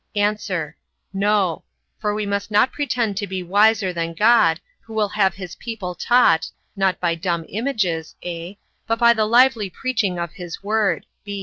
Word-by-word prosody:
A. 205 Hz, +1 st, +2 dB, 0.8 s
No: 195 Hz, -3 st, +1 dB, 0.4 s
for 210 Hz, -1 st, -1 dB
we 210 Hz, 0 st, -2 dB
must 200 Hz, +1 st, -2 dB
not 210 Hz, +4 st, +3 dB
pretend 240 Hz, -8 st, -1 dB
to 205 Hz, -1 st, -2 dB
be 190 Hz, -1 st, -4 dB
wiser 200 Hz, +1 st, +3 dB
than 165 Hz, -1 st, -3 dB
God, 210 Hz, -5 st, +4 dB, 0.2 s
who 225 Hz, -, -12 dB
will 210 Hz, -2 st, +1 dB
have 195 Hz, -4 st, +1 dB
his 180 Hz, -3 st, -8 dB
people 220 Hz, -6 st, -6 dB
taught, 180 Hz, -4 st, +3 dB, 0.3 s
not 195 Hz, -2 st, +1 dB
by 175 Hz, -2 st, +1 dB
dumb 170 Hz, 0 st, -2 dB
images, 200 Hz, -, -2 dB
(a) 175 Hz, +2 st, -6 dB, 0.3 s
but 230 Hz, -, +1 dB
by 235 Hz, 0 st, +6 dB
the 220 Hz, -2 st, +1 dB
lively 235 Hz, -2 st, +4 dB
preaching 215 Hz, -5 st, -1 dB
of 170 Hz, -1 st, -4 dB
his 180 Hz, -1 st, -8 dB
word. 210 Hz, 0 st, 0 dB
200 Hz, 165 wpm, -21 LUFS, 180-220 Hz, 0.8 s, by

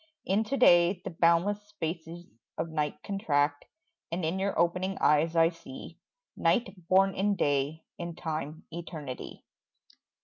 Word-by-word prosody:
Into 220 Hz, +7 st, +1 dB
day 175 Hz, -5 st, +5 dB
The -, -, -5 dB
boundless 170 Hz, +5 st, +2 dB
spaces 175 Hz, -4 st, -6 dB, 0.3 s
of 165 Hz, -, -2 dB
night 150 Hz, -2 st, -2 dB
contract 145 Hz, -7 st, 0 dB, 0.5 s
And 170 Hz, 0 st, -2 dB
in 170 Hz, +4 st, -1 dB
your 195 Hz, +1 st, -1 dB
opening 180 Hz, +3 st, +1 dB
eyes 155 Hz, +3 st, +3 dB
I 165 Hz, 0 st, +5 dB
see 165 Hz, -6 st, -11 dB, 0.4 s
Night 235 Hz, -6 st, +1 dB
born 195 Hz, +2 st, +4 dB
in 200 Hz, +2 st, +1 dB
day, 145 Hz, 0 st, 0 dB, 0.2 s
in 170 Hz, -1 st, -5 dB
time 155 Hz, -1 st, -4 dB
eternity. 160 Hz, -6 st, -7 dB
170 Hz, 130 wpm, -29 LUFS, 160-190 Hz, 0.5 s, day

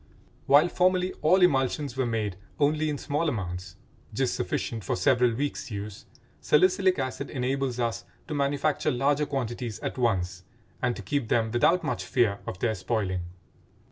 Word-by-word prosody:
While 145 Hz, +5 st, +6 dB
formerly 185 Hz, +1 st, +2 dB
all 180 Hz, +4 st, +4 dB
emulsions 135 Hz, -3 st, +2 dB
were 130 Hz, -2 st, 0 dB
made 110 Hz, -4 st, -1 dB, 0.2 s
only 155 Hz, +2 st, +2 dB
in 145 Hz, -, -2 dB
small 150 Hz, +3 st, -1 dB
amounts, 90 Hz, -, -5 dB, 0.4 s
just -, -, +1 dB
sufficient 115 Hz, -3 st, -3 dB
for -, -, -1 dB
several 125 Hz, -3 st, +3 dB
weeks' 140 Hz, +1 st, -3 dB
use, 105 Hz, -1 st, -7 dB, 0.3 s
salicylic 185 Hz, +3 st, +3 dB
acid 135 Hz, +1 st, -3 dB
enables 130 Hz, -1 st, -1 dB
us 115 Hz, -2 st, -1 dB, 0.2 s
to 155 Hz, -, -4 dB
manufacture 145 Hz, +1 st, 0 dB
larger 145 Hz, +3 st, +1 dB
quantities 120 Hz, -4 st, -3 dB
at -, -, -4 dB
once 90 Hz, -7 st, 0 dB, 0.4 s
and 120 Hz, -, +1 dB
to 105 Hz, -, -8 dB
keep 125 Hz, +5 st, -1 dB
them 110 Hz, 0 st, +1 dB
without 165 Hz, +10 st, +3 dB
much 150 Hz, -, -2 dB
fear 110 Hz, -5 st, +1 dB
of -, -, -4 dB
their 110 Hz, +3 st, 0 dB
spoiling. 95 Hz, -3 st, -2 dB
130 Hz, 155 wpm, -27 LUFS, 110-145 Hz, 0.4 s, While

